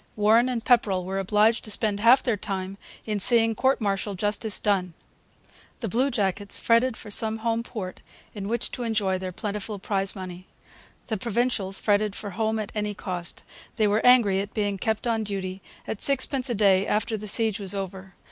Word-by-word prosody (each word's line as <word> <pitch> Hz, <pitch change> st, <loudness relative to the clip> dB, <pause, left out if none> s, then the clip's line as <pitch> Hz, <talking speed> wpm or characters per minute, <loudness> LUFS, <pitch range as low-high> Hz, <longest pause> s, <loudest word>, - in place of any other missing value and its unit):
Warren 220 Hz, +4 st, +4 dB
and 240 Hz, -2 st, -3 dB
Pepperrell 200 Hz, -7 st, +2 dB
were 190 Hz, +1 st, -3 dB
obliged 210 Hz, +4 st, +2 dB
to -, -, -4 dB
spend 205 Hz, -1 st, +1 dB
half 240 Hz, +5 st, +5 dB
their 240 Hz, -4 st, +1 dB
time 195 Hz, -1 st, -5 dB, 0.3 s
in 210 Hz, -2 st, -2 dB
seeing 225 Hz, +2 st, +7 dB
court 260 Hz, +5 st, +1 dB
martial 200 Hz, -1 st, -2 dB
justice 205 Hz, +2 st, 0 dB
done. 185 Hz, -5 st, 0 dB, 0.9 s
The 230 Hz, -, -2 dB
bluejackets 205 Hz, -4 st, 0 dB
fretted 230 Hz, +1 st, +2 dB
for 210 Hz, -, -10 dB
some 220 Hz, +1 st, 0 dB
home 230 Hz, +1 st, -1 dB
port 210 Hz, -6 st, -7 dB, 0.3 s
in 200 Hz, -2 st, -6 dB
which 235 Hz, +2 st, -2 dB
to -, -, -6 dB
enjoy 210 Hz, -5 st, 0 dB
their 185 Hz, 0 st, -5 dB
plentiful 210 Hz, +2 st, -5 dB
prize 195 Hz, 0 st, 0 dB
money. 185 Hz, -1 st, -8 dB, 0.6 s
The 220 Hz, -, -3 dB
Provincials 230 Hz, -3 st, -1 dB
fretted 205 Hz, -1 st, +1 dB
for 205 Hz, -, -6 dB
home 220 Hz, +3 st, -1 dB
at 215 Hz, -2 st, -4 dB
any 210 Hz, -1 st, -3 dB
cost. 180 Hz, -3 st, -5 dB, 0.3 s
They 215 Hz, -, +2 dB
were 210 Hz, +2 st, +1 dB
angry 235 Hz, -6 st, +5 dB
at 200 Hz, +1 st, -5 dB
being 205 Hz, -2 st, -1 dB
kept 220 Hz, +3 st, -2 dB
on 225 Hz, -2 st, 0 dB
duty 195 Hz, -2 st, -5 dB, 0.2 s
at 210 Hz, -, -5 dB
sixpence 270 Hz, -1 st, +2 dB
a 240 Hz, -, -1 dB
day 195 Hz, -2 st, +3 dB
after 220 Hz, +2 st, 0 dB
the 210 Hz, 0 st, -6 dB
siege 220 Hz, 0 st, +2 dB
was 200 Hz, -1 st, -2 dB
over. 190 Hz, -1 st, -7 dB
210 Hz, 185 wpm, -25 LUFS, 195-225 Hz, 0.9 s, seeing